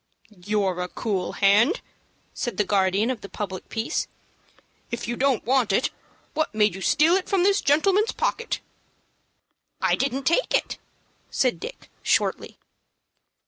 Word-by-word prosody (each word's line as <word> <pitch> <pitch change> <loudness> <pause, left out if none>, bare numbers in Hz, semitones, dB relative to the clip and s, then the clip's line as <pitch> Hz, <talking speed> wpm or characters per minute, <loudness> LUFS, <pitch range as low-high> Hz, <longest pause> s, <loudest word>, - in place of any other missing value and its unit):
"You're 195 -1 -1
a 180 - -2
cool 190 -1 -3
hand," 210 - +4 0.5
said 240 - -4
the 210 - +3
guardian 200 +3 +2
of 245 - -5
the 200 - -9
public 190 -3 -6
peace. 225 +1 -2 0.8
"If 235 - -4
you 240 - -2
don't 265 -1 +1
want 250 -3 +2
it, 200 - +1 0.4
what 315 -8 -1
made 210 -2 +3
you 190 - -8
steal 305 - +4
it 375 0 0
from 385 -3 +2
this 400 +1 +3
gentleman's 390 +10 +3
pocket?" 465 - -2 1.2
"I - - +2
didn't 275 0 0
take 335 - +2
it," - - -1 0.5
said 255 -2 +1
Dick, 480 +3 -8
shortly. - - 0
240 Hz, 140 wpm, -24 LUFS, 200-310 Hz, 1.2 s, hand